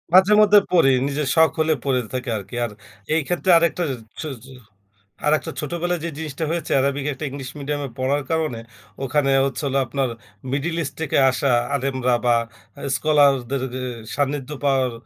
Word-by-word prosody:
মাঝে-মধ্যে 210 +2 +7
পরি, 165 -6 +5 0.2
নিজের 145 0 -2
শখ 160 0 +6
হলে 160 0 +3
পরে 130 -2 +2
থাকি 125 -1 -3
আরকি। 100 +3 -8
আর 110 - -6 0.4
এই 160 - +3
ক্ষেত্রে 175 +1 +1
আরেকটা 170 +1 +1
এ - - -4 0.3
ছো 155 - -4 0.2
ছো 135 - -13 0.7
আরেকটা 150 +1 +1
ছোটবেলায় 175 +2 -2
যে 170 - -2
জিনিসটা 160 -1 -5
হয়েছে, 170 -1 -3
অ্যারাবিক 140 +1 +1
একটা 150 - -6
ইংলিশ 135 -2 -7
মিডিয়াম 145 +1 -3
এ - - -10
পড়ার 135 +2 0
কারণে, 155 -8 -1 0.4
ওখানে 135 +1 +1 0.2
হচ্ছিল 140 0 -2
আপনার, 135 0 -1 0.4
মিডল 150 +5 -1
ইস্ট 140 -2 -4
থেকে 160 - 0
আসা 135 +2 0 0.3
আলেমরা 130 -2 0
বা 120 -1 +4 0.6
স্কলারদের 140 -3 +2
গে 130 - -4 0.3
সান্নিধ্য 140 -1 -1
পাওয়ার 135 -3 +2
140 Hz, 160 wpm, -22 LUFS, 130-160 Hz, 0.7 s, মাঝে-মধ্যে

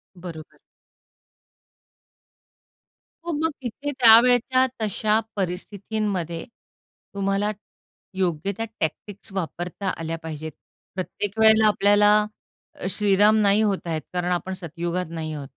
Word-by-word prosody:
बरोबर. 170 -3 -10 2.7
हो, 345 - -2
मग 315 +2 0
तिथे 270 +4 -4
त्यावेळच्या 250 +1 +6 0.2
तशा 215 +1 +1 0.2
परिस्थितीमध्ये 190 -2 -3 0.7
तुम्हाला 200 +1 0 0.7
योग्य 180 0 0
त्या 225 - -2
टॅक्टिक्स 200 +6 -4
वापरता 180 +1 -4
आल्या 165 0 -4
पाहिजेत. 160 0 -6 0.4
प्रत्येक 200 +3 -3
वेळेला 220 0 +6
आपल्याला 205 0 +4 0.6
अ, - - -8
श्रीराम 205 +2 +3
नाही 200 +1 +4
होतायेत, 180 -7 -1
कारण 180 0 -1
आपण 180 +2 -2
सत्ययुगात 175 0 -4
नाही 160 -2 -4
आहोत. 145 -2 -6
195 Hz, 100 wpm, -24 LUFS, 175-215 Hz, 2.7 s, त्यावेळच्या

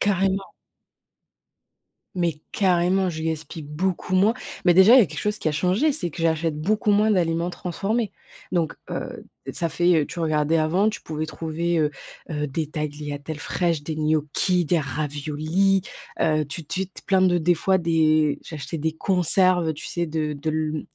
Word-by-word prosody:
Carrément. 195 -1 0 1.6
Mais 170 -4 -1
carrément, 185 0 +2
je 160 -1 -6
gaspille 160 0 -4
beaucoup 175 +5 -2
moins. 200 +4 +4 0.3
Mais 180 - +6
déjà, 190 +6 +8
il - - +9
y - - +8
a 195 - +1
quelque 155 0 -7
chose 210 0 -1
qui 155 - -1
a - - -1
changé, 190 - +1
c'est 175 - -3
que 165 - -7
j'achète 160 -1 0
beaucoup 210 +6 0
moins 210 +1 +3
d'aliments 170 -2 +1
transformés. 195 +4 -2 0.4
Donc, 170 -4 0 0.2
heu, - - -5 0.3
ça 170 - -1
fait, 175 +2 +2
heu, - - -4
tu 175 - -8
regardais 155 0 +1
avant, 170 +7 +2
tu 215 - -5
pouvais 155 0 -4
trouver, 165 +2 -2
heu 150 -1 +2 0.4
heu, 150 -1 -2
des 150 +3 -3
tagliatelles 150 -1 -5
fraîches, 165 0 -1
des 155 +1 -4
gnocchis, 155 +4 +1
des 165 +1 +1
raviolis. 155 +6 0 0.4
Heu, 155 -1 +2
tu 155 +3 -7
tu 185 +5 -3
te 190 - -13
plein 190 -1 +2
de 180 -1 +4
des 175 +2 +2
fois 190 +3 +1
des 155 -3 +2
j'achetais 160 +1 -6
des 160 +1 -1
conserves, 180 -1 +5
heu, - - +1
tu 150 - -8
sais, 170 -1 -2
de 155 -1 -2
de 145 +2 -5
l 155 -1 -2
165 Hz, 180 wpm, -23 LUFS, 155-185 Hz, 1.6 s, il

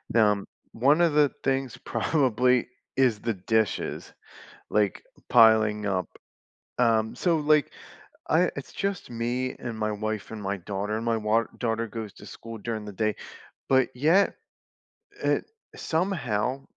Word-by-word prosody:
n - - +6
um, 105 -2 +2 0.2
one 140 +8 +3
of 165 -3 +3
the 150 -2 +5
things 135 -3 -1
probably 125 -1 +1 0.3
is 125 -5 +3
the 115 -1 -2
dishes, 110 +2 -1 0.6
like, 105 -2 +1 0.3
piling 110 -2 +5
up, 95 -4 -1 0.7
um, 110 -2 +2
so, 170 -3 +2
like, 150 0 +3 0.6
I - - +3
it's - - -7
just 195 -2 -3
me 120 +2 -2
and 115 -2 -6
my 110 0 -1
wife, 110 0 -4
and 110 -2 -7
my 100 0 -2
daughter, 100 +3 -3
and 115 - -4
my 115 -1 +1
wa 110 +1 +2
daughter 115 -1 -1
goes 110 -2 -6
to - - -13
school 115 -1 -9
during 110 -1 -4
the 105 - -7
day, 110 +2 -1 0.5
but 130 -1 +4
yet, 160 +10 +3 0.9
it - - +1 0.3
somehow, 135 - -1
115 Hz, 145 wpm, -26 LUFS, 105-130 Hz, 0.9 s, n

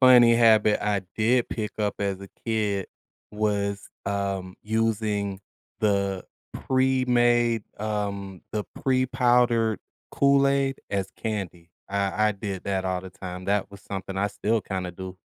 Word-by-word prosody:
funny 125 -2 +8
habit 110 -3 +5
I 105 -2 +1
did 120 +3 +3
pick 110 -2 -3
up 105 -1 0
as 100 -1 -1
a 100 - -9 0.2
kid 105 -4 0 0.4
was, 100 -1 -1 0.2
um, 100 -2 -2
using 105 -3 0 0.4
the 100 -3 +1 0.3
pre-made, 120 -3 +2 0.2
um, 100 -3 -3
the 105 -1 -1 0.2
pre-powdered 125 -4 +3 0.3
Kool 140 0 +4
Aid 135 -1 +1
as 100 -1 -1
candy. 90 -6 -4 0.2
I 100 +2 +1
I - - +1
did 100 -2 -5
that 95 -1 -1
all 95 -1 -1
the 95 0 -9
time, 90 -1 -7
that 100 +1 0
was 100 - -12
something 95 -2 -5
I 100 +1 +2
still 110 +2 0
kinda 95 -3 -4
do. 95 +1 -8
105 Hz, 135 wpm, -26 LUFS, 100-115 Hz, 0.4 s, funny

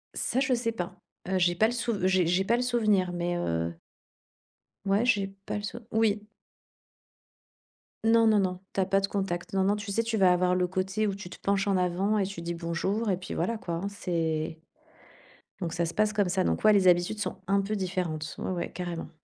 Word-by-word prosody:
Ça, 255 - 0
je 265 -1 +2
sais 235 -1 -1
pas, 185 -4 -5 0.3
heu, 190 0 +1
j'ai 175 -1 +3
pas 215 +5 +4
le - - -1
souv 230 -5 -1
j'ai 185 -2 +3
j'ai 180 +3 +2
pas 230 +4 +2
le 245 - 0
souvenir, 215 -7 +2
mais, 175 0 -1
heu 85 - -1 1.1
ouais, 200 +4 +2
j'ai 205 -5 +2 0.2
pas - - -2
le 205 - -5
sou 220 +3 -5
oui. 220 -2 +2 1.8
Non, 225 0 +5
non, 215 -1 +5
non, 185 -2 -1
tu - - -2
as 190 - +3
pas 195 +1 +2
de 195 - 0
contact, 190 -3 -3
non, 190 -1 +1
non, 200 +1 +3
tu 210 0 -5
sais, 230 +3 +1
tu 225 0 -2
vas 190 -4 +5
avoir 180 0 +3
le 180 0 +2
côté 190 +3 -1
où 200 - 0
tu 195 -3 -8
te - - -10
penches 200 +1 0
en 195 - +2
avant 185 +4 +1
et 200 - +2
tu 190 -3 -6
dis 170 0 -3
«Bonjour» 170 +6 -1
et 180 - +1
puis 185 - -7
voilà 225 +7 -1
quoi 175 -5 -5
hein, 200 - -1
c'est 160 -4 -2 1.0
donc 170 -3 -2
ça 170 0 0
se 165 - -4
passe 215 0 +2
comme 205 -3 +1
ça. 185 +1 +1
Donc - - 0
ouais, 215 0 +7
les 195 -2 +4
habitudes 175 +4 +3
sont - - -3
un 200 +1 +3
peu 205 +2 -2
différentes. 180 -5 -2
Ouais, - - -3
ouais, 175 -2 -3
carrément. 175 -2 -5
190 Hz, 225 wpm, -28 LUFS, 175-210 Hz, 1.8 s, ouais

